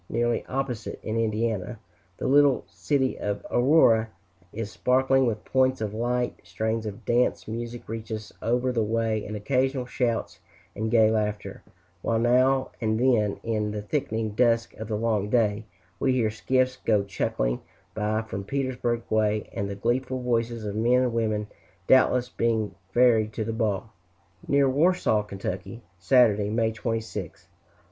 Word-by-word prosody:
Nearly 120 0 0
opposite, 130 -4 -3
in 110 - -3
Indiana, 110 -1 -1 0.4
the - - -5
little 140 0 +4
city 130 +10 -1
of 105 -1 -3
Aurora 120 -4 +4 0.4
is 110 -1 -5
sparkling 130 +1 +2
with 110 -2 -3
points 130 0 +2
of 105 -2 -3
light, 120 +2 -1
strains 110 +5 -3
of 105 -1 -8
dance 120 +1 +1
music 120 +2 -6
reach 110 0 -6
us 110 -1 -6
over 125 +3 +1
the 120 -2 0
way, 110 0 0
and 105 - -6
occasional 130 +3 0
shouts 120 -2 -2 0.4
and 110 +1 -2
gay 110 -1 +5
laughter; 105 -1 -2 0.4
while 115 - 0
now 130 +3 +3
and 110 -1 0
then, 115 -5 +2
in 110 -2 -1
the 105 0 -4
thickening 110 -4 -2
dusk 115 +1 +2
of 110 - -6
the 110 - -2
long 105 -2 0
day, 105 -2 +1 0.3
we 130 - +2
hear 115 -4 +1
skiffs 130 +3 0
go 105 -5 +1
chucking - - -2 0.3
by 110 +1 -1
from 100 -3 -6
Petersburg 125 -1 -2
way, 110 -1 +1
and 100 0 -3
the 100 - -4
gleeful 125 +5 -1
voices 115 -2 -1
of 100 -1 -4
men 120 +3 +3
and 125 -2 0
women 110 -2 0 0.4
doubtless 125 0 +4
being 115 -3 -1 0.2
ferried 115 -2 +4
to 110 - -2
the 115 - -3
ball. 110 -1 -1 0.6
Near 140 -1 +4
Warsaw, 145 -5 +2
Ky., 100 +3 -6 0.2
Saturday, 105 -3 +4
May 110 +1 +1
26th. 110 -5 -4
115 Hz, 155 wpm, -26 LUFS, 105-125 Hz, 0.6 s, gay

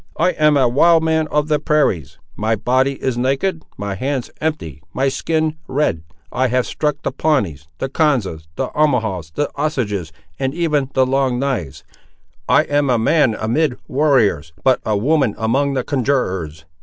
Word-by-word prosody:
I 175 +3 +3
am 150 -3 +3
a 130 -2 +4
wild 160 +7 +4
man 160 -1 +1
of 150 0 0
the 150 -1 +1
prairies; 145 - 0 0.2
my 110 +2 0
body 130 +5 +1
is 125 -2 -1
naked; 140 +7 0 0.2
my 100 0 -3
hands 130 +5 -3
empty; 140 - -3
my 135 +1 +2
skin 155 +2 -1
red. 130 - 0 0.3
I 130 +1 +1
have 125 0 +1
struck 150 -2 -2
the - - -1
Pawnees, 105 - -1
the - - -2
Konzas, 125 - 0
the - - -2
Omahaws, 110 - 0
the 145 - -1
Osages, 110 - -2 0.3
and 135 +1 -1
even 150 -6 0
the 130 - +4
Long 130 -1 +1
knives. 125 - -3 0.7
I - - +5
am 145 -1 0
a 125 - +3
man 125 0 +3
amid 125 +5 0
warriors, 120 - +2
but 130 -1 +4
a 105 -1 0
woman 135 0 +1
among 135 +5 0
the 130 - 0
conjurors. 95 - -1
130 Hz, 165 wpm, -19 LUFS, 110-150 Hz, 0.7 s, I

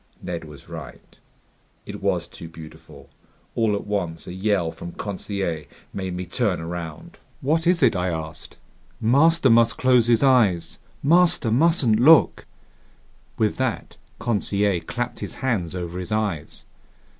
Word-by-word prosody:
Ned 85 -2 -6
was 75 -2 -13
right. - - -11 0.7
It - - -8
was - - 0
too 85 - -10
beautiful. 80 -1 -13 0.5
All 110 -3 +1
at 100 - -5
once 90 -6 -3
a 90 - -7
yell 95 -3 0
from 85 +1 -9
Conseil 95 -5 -4 0.3
made 95 -2 -4
me 90 0 -4
turn 100 +2 -1
around. 85 -1 -7 0.2
"What 160 +4 +1
is 175 -3 +3
it?" 115 -5 +4
I 90 0 0
asked. 80 -1 -7 0.4
"Master 140 +4 +4
must 115 0 +4
close 125 -3 +3
his 120 0 +3
eyes! 115 -11 +2 0.2
Master 165 -6 +3
mustn't 130 -4 +3
look!" 155 +6 +5 0.9
With 110 -2 0
that, 130 -4 -3 0.2
Conseil 100 -5 0
clapped 120 +8 -4
his - - -7
hands 100 -10 -2
over 90 0 -5
his 90 - -6
eyes. 105 -8 -3
105 Hz, 140 wpm, -23 LUFS, 85-125 Hz, 0.9 s, look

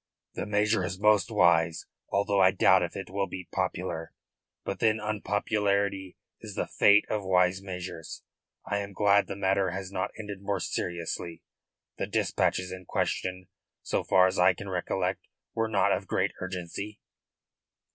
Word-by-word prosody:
"The - - -4
measure 105 0 +2
is 95 +1 -4
most 105 -1 +4
wise, 85 -5 +3 0.2
although 100 0 +2
I 95 - +7
doubt 95 - +4
if - - -3
it - - -6
will 100 0 -1
be 90 0 -7
popular. 80 0 -3 0.5
But, 95 - -4
then, 110 -1 +3
unpopularity 100 -2 -1 0.2
is - - -9
the - - -1
fate 105 +1 +5
of 105 -2 -2
wise 90 0 +2
measures. 90 -4 -7 0.4
I 100 - -1
am 100 0 -6
glad 100 0 +3
the 100 - -5
matter 95 0 +1
has 95 +1 -5
not 95 -2 -2
ended 105 -3 -7
more 100 -1 -1
seriously. 85 -1 -4 0.6
The - - -1
dispatches 90 0 0
in 95 0 -8
question, 95 +1 -2 0.4
so - - -1
far 95 -1 +5
as 95 0 0
I 90 +1 +5
can 100 +3 -8
recollect, 90 0 -2 0.3
were 115 0 0
not 105 -3 +2
of - - -1
great - - +1
urgency." 95 +3 -5
95 Hz, 155 wpm, -28 LUFS, 90-100 Hz, 0.6 s, I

